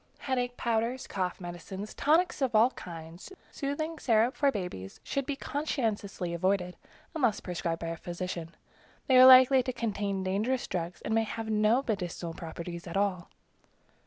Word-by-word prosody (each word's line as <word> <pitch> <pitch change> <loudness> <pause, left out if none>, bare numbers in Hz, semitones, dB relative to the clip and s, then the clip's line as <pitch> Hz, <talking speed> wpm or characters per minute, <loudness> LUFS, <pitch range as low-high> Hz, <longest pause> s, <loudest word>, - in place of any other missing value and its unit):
Headache 245 -2 -2
powders, 235 +2 -1
cough 185 -2 -3
medicines, 185 +3 -7
tonics 320 +2 +2
of 255 -4 +1
all 230 +4 +6
kinds, 170 - -10 0.2
soothing 310 +3 -3
syrup 230 +1 +2
for 280 -1 +3
babies, 180 - -6
should 275 -1 -2
be 285 - -1
conscientiously 220 - -2
avoided, 180 +1 0 0.4
unless 250 - +1
prescribed 170 -2 -3
by 165 - -3
a 165 - -4
physician. 175 -1 -5 0.5
They 260 -2 +5
are 255 - +10
likely 260 0 +8
to 255 - -3
contain 205 -5 -2
dangerous 215 +7 0
drugs, 175 0 -4
and 220 - -2
may 225 - +4
have 225 0 -4
no 215 +5 +3
medicinal 180 -5 -3
properties 170 +1 -7
at 170 - -3
all. 195 -4 0
210 Hz, 155 wpm, -29 LUFS, 175-255 Hz, 0.5 s, are